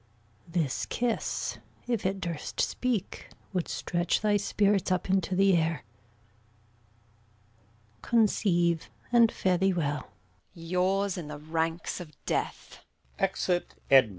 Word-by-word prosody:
This 165 -6 -1
kiss, 240 -2 -1 0.3
if 235 -6 0
it 195 +1 -2
durst 170 -3 -4
speak, 240 -7 -1 0.2
Would 180 -3 -1
stretch 175 -1 0
thy 210 -1 +3
spirits 200 -1 +1
up 185 +1 0
into 190 -1 +1
the 195 0 +5
air. 160 -4 0 2.2
Conceive, 175 -7 +2 0.2
and 235 -2 +6
fare 180 -2 +1
thee 190 0 +3
well. 150 -4 -1 0.5
Edm. 165 -1 -10
Yours 190 +2 +1
in 160 - -6
the 150 0 -6
ranks 160 +4 -2
of 175 -3 -8 0.2
death! - - -3 0.4
Exit. 185 -2 0 0.2
Gon. 135 -4 +8
180 Hz, 120 wpm, -29 LUFS, 165-195 Hz, 2.2 s, Gon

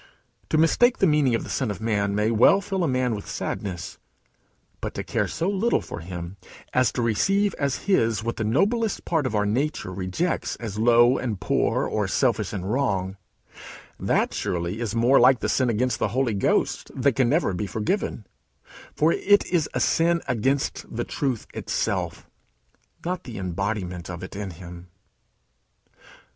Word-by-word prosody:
To 155 - +2
mistake 240 +10 +4
the - - +3
meaning 150 -7 +3
of - - -2
the - - -8
Son 130 -4 -1
of 105 - -4
man 100 -3 0
may 105 +2 +1
well 115 - +5
fill 195 -2 -2
a - - +2
man 130 -2 +1
with 105 - -6
sadness. 90 -4 -5 0.8
But - - -5
to - - -3
care - - -1
so 170 - -2
little 205 +4 +1
for - - -7
him 85 +2 -7 0.4
as 125 -2 +3
to 120 - -1
receive 195 - +2
as 140 -2 -1
his 115 - +2
what 115 +1 -3
the 110 - -1
noblest 205 - +1
part 160 -6 +1
of 120 - -3
our 105 0 +2
nature 120 -3 -1
rejects 95 - -2
as 110 -3 -6
low 120 +2 +5
and 110 -7 -3
poor, - - +1
or - - -1
selfish - - +1
and 100 +1 -3
wrong, 100 -8 0 0.8
that - - +1
surely 85 +4 -2
is 115 -2 -3
more 120 +4 +5
like 125 +2 +6
the - - -2
sin 130 -2 +2
against 120 +1 0
the - - +1
Holy 130 -4 +2
Ghost 100 - 0
that 135 +1 +2
can 130 -3 +2
never 150 - +2
be 100 +3 -3
forgiven; 110 - -2 0.7
for 155 +2 +3
it 205 0 +3
is 170 -4 0
a - - +1
sin 170 +1 +2
against 135 +3 0
the 120 +1 -3
truth 130 -4 -2
itself, - - -2 0.8
not 180 0 -2
the 120 -3 -8
embodiment 90 -1 -3
of 90 0 -6
it 95 - -8
in 100 -1 -4
him. 85 0 -10
120 Hz, 175 wpm, -24 LUFS, 100-150 Hz, 0.8 s, like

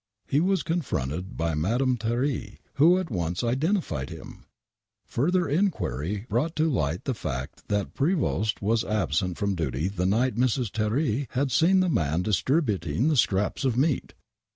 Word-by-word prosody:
He 140 - +2
was 190 +3 +1
confronted 90 - -3
with 80 -1 0
Madame 125 - +1
Thierry, 120 -1 -2 0.2
who 165 +6 +6
at 185 -6 -3
once 85 -1 -2
identi 155 - +1
fied 65 -4 -4
him! - - -10 0.6
Further 175 +8 +1
enquiry 105 - -1
brought 130 +10 0
to 160 +1 +2
light 80 - -1
the 135 - -1
fact 65 - -6
that 105 -1 -1
Prevost 140 - 0
was 110 +2 +2
absent 90 - -1
from 100 -2 0
duty 80 -1 -1
the 90 -2 -1
night 115 +6 +2
Mrs. 125 -3 +1
Thierry 115 +4 0
had 135 +1 0
seen 180 +9 +4
the 185 - +2
man 80 - +1
dis 105 0 +1
tributing 115 - +1
the 155 - +2
scraps 105 0 +1
of 125 -3 +1
meat 140 0 0
115 Hz, 160 wpm, -26 LUFS, 90-145 Hz, 0.6 s, who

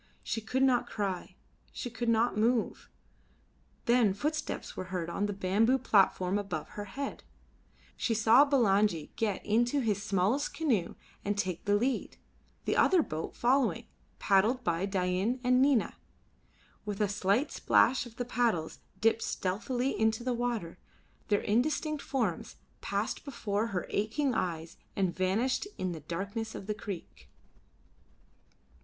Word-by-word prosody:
She 225 - -2
could 250 +5 0
not 245 -2 +3
cry, 195 -4 -3 0.4
she 245 - -5
could 230 +1 -2
not 230 0 +2
move. 230 +2 0 1.0
Then 235 -5 +4
footsteps 300 +7 -3
were 185 - -4
heard 180 -2 -3
on 205 +4 -1
the - - -2
bamboo 205 +6 +2
platform 195 -4 +3
above 180 -7 -4
her 205 - -6
head; 275 +7 -5 0.7
she 230 - 0
saw 225 +5 +6
Bulangi 210 - +2
get 210 -4 -1
into 240 +6 +2
his 210 -6 0
smallest 215 +7 0
canoe 240 - 0 0.3
and 205 0 -1
take 185 -4 -2
the 205 0 +3
lead, 250 +5 -1 0.5
the - - +1
other 365 -4 +5
boat 155 - -5
following, 255 +2 +2 0.3
paddled 220 +6 +2
by 170 +3 0
Dain 190 +5 0
and 250 +1 +4
Nina. 270 -4 +3 0.9
With 205 -1 -4
a 210 - +3
slight 200 +7 +1
splash 255 -1 +3
of 230 - -15
the 245 - -3
paddles 225 -10 0 0.2
dipped 225 +1 +3
stealthily 245 +8 -1
into 220 +1 +1
the 255 0 0
water, 235 -8 -3 0.5
their 205 -1 +2
indistinct 300 +6 0
forms 225 -11 -2 0.3
passed - - -2
before 220 -6 -2
her 190 -5 -3
aching 245 +7 0
eyes 165 -4 -3 0.2
and 190 -3 0
vanished 215 - 0
in 185 -1 -2
the 165 - -5
darkness 200 +8 -4
of - - -7
the 210 - -1
creek. 200 -4 -8
220 Hz, 140 wpm, -30 LUFS, 195-245 Hz, 1.0 s, saw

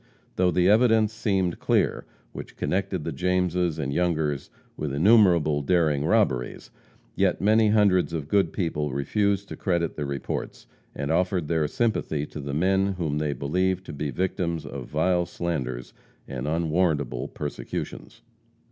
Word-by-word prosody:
Though 90 0 +3
the 90 0 +2
evidence 110 0 +4
seemed 95 -5 0
clear, - - +1 0.3
which - - -9
connected - - -1
the - - -3
Jameses 90 -2 0
and 70 -3 -2
Youngers 80 -5 0 0.3
with 75 -2 -3
innumerable 85 -5 +4
daring 75 -2 +2
robberies, 80 - 0 0.4
yet - - +1
many 110 +2 +4
hundreds 100 -5 +3
of 80 -4 -4
good 95 -2 +2
people 75 -6 -2
refused 100 +8 0
to - - -6
credit 85 -3 -1
the 75 -2 -2
reports, 70 -2 -5 0.3
and 70 - -2
offered 90 -1 +1
their 80 -3 +1
sympathy 80 -7 -1
to 75 - -9
the 70 -1 -4
men 95 +4 +2
whom 80 -5 -2
they 75 -1 -1
believed 95 +7 -1
to - - -8
be 75 +1 -3
victims 85 +2 -2
of - - -7
vile 85 +3 +1
slanders 65 -9 -4 0.3
and 65 0 -5
unwarrantable 80 -3 0
persecutions. 105 +9 -6
85 Hz, 145 wpm, -25 LUFS, 75-95 Hz, 0.4 s, evidence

